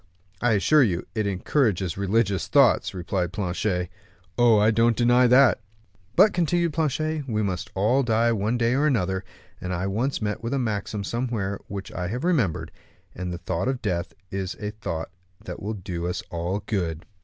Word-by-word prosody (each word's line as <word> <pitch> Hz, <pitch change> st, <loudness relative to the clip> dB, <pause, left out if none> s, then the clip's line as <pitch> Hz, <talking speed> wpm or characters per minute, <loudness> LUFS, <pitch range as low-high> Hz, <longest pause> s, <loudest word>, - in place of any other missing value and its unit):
"I 120 Hz, -2 st, +3 dB
assure 150 Hz, +9 st, +4 dB
you 90 Hz, -9 st, +1 dB
it 110 Hz, -2 st, -1 dB
encourages 100 Hz, -, 0 dB
religious 100 Hz, -1 st, 0 dB
thoughts," -, -, +4 dB
replied 90 Hz, -1 st, -2 dB
Planchet. 90 Hz, -2 st, -1 dB, 0.5 s
"Oh, 120 Hz, -2 st, +5 dB
I 105 Hz, +2 st, +4 dB
don't 115 Hz, +1 st, +3 dB
deny 120 Hz, +1 st, +5 dB
that." 125 Hz, -1 st, +5 dB, 0.5 s
"But," 210 Hz, -, +6 dB
continued 170 Hz, -1 st, +1 dB
Planchet, 155 Hz, -1 st, -1 dB
"we 110 Hz, -3 st, 0 dB
must 95 Hz, -3 st, -3 dB
all 110 Hz, +8 st, +3 dB
die 115 Hz, -1 st, +2 dB
one 110 Hz, +2 st, 0 dB
day 120 Hz, 0 st, +2 dB
or 145 Hz, +3 st, +2 dB
another, 95 Hz, -8 st, 0 dB, 0.4 s
and 90 Hz, -, -4 dB
I 90 Hz, +1 st, -2 dB
once 115 Hz, +8 st, -1 dB
met 105 Hz, -1 st, -3 dB
with 115 Hz, +3 st, -2 dB
a -, -, 0 dB
maxim 105 Hz, -4 st, -2 dB
somewhere 115 Hz, -4 st, -2 dB
which 100 Hz, -1 st, -6 dB
I 90 Hz, -1 st, -3 dB
have 120 Hz, +7 st, -4 dB
remembered, 135 Hz, -, 0 dB, 0.4 s
that 90 Hz, 0 st, -5 dB
the 90 Hz, -, -4 dB
thought 85 Hz, +3 st, -2 dB
of 130 Hz, -1 st, -2 dB
death 90 Hz, -4 st, -2 dB, 0.2 s
is 95 Hz, -1 st, -3 dB
a 105 Hz, -1 st, -3 dB
thought 85 Hz, -6 st, -5 dB, 0.3 s
that -, -, -7 dB
will 110 Hz, +2 st, -3 dB
do 90 Hz, -3 st, -4 dB
us 90 Hz, -, -3 dB
all 85 Hz, +4 st, -2 dB
good." 85 Hz, -6 st, -2 dB
105 Hz, 180 wpm, -25 LUFS, 95-120 Hz, 0.5 s, But